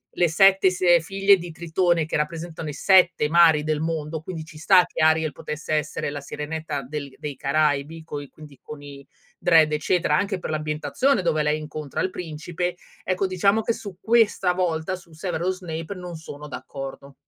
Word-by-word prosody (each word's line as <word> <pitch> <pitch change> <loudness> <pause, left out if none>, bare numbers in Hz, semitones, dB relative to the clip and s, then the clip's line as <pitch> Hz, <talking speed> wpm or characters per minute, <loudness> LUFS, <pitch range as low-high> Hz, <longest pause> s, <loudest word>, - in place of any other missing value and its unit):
le 175 - +3
7 195 +3 +5
si 185 0 -2
ehm, 175 -1 +7
figlie 195 +3 +3
di 175 -1 -8
Tritone 170 0 +1
che - - -1
rappresentano 160 +1 -4
i - - -5
7 180 -2 +4
mari 160 -2 +5
del 155 0 -1
mondo, 160 -1 -3
quindi 160 -1 -6
ci 155 -1 -13
sta 180 +3 +5
che - - -5
Ariel 160 -1 +3
potesse 155 0 -5
essere 150 -1 -1
la 145 0 -5
sirenetta 150 0 -5
del 140 0 -6
dei 145 -2 -6
Caraibi 150 +2 0
coi 145 -2 -6
quindi 145 -2 -15
con 150 -1 -10
i 140 -1 -11 0.3
dread 160 -3 +5
eccetera, 150 0 +1
anche 195 +2 -1
per 175 - -6
l'ambientazione 155 - 0
dove 155 -2 +1
lei 150 +1 +1
incontra 150 -2 -5
il 185 - 0
principe, 175 +2 -4 0.3
ecco 185 +1 0
diciamo 200 +4 +2
che 230 - 0
su 200 -5 -9
questa 225 -5 +3
volta, 180 0 -1
su 170 -2 -18
Severus 180 +2 -2
Snape, 165 +1 -6
non 180 -1 -7
sono 150 -2 -9
d'accordo. 135 -1 -8
160 Hz, 180 wpm, -24 LUFS, 150-180 Hz, 0.3 s, ehm